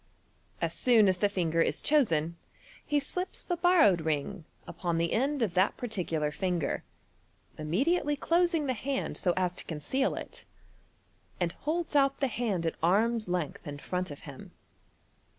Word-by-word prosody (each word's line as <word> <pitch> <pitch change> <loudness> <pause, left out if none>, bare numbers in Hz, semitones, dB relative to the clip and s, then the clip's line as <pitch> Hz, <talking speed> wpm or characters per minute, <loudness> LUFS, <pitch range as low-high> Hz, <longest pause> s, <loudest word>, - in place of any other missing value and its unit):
As - - -1
soon 230 -5 +4
as 185 -1 +3
the 205 +2 +2
finger 165 -4 +1
is - - +1
chosen, 170 - +2 0.5
he 295 0 +1
slips 360 +6 -5
the 350 - -1
borrowed 335 - +5
ring 160 +3 -2 0.2
upon 170 -3 -2
the 170 0 0
end 275 +2 +1
of 200 -6 -1
that 185 +2 +2
par 245 - -4
ticular 160 -8 -2
finger, 180 -3 -1 0.7
immediately 280 - +1
closing 335 +1 +2
the 260 - +1
hand 265 +4 -3
so 180 - +1
as 180 -1 +1
to 180 - -6
conceal 170 - -1
it, - - -8 1.0
and 175 -2 0
holds 320 - -3
out 275 -1 +3
the 275 - +2
hand 220 -9 -1
at 165 - 0
arm's 215 +6 +2
length 175 -6 -3
in 145 0 -5
front 180 +4 -3
of 145 - -9
him. 140 -3 -10
200 Hz, 160 wpm, -30 LUFS, 170-275 Hz, 1.0 s, borrowed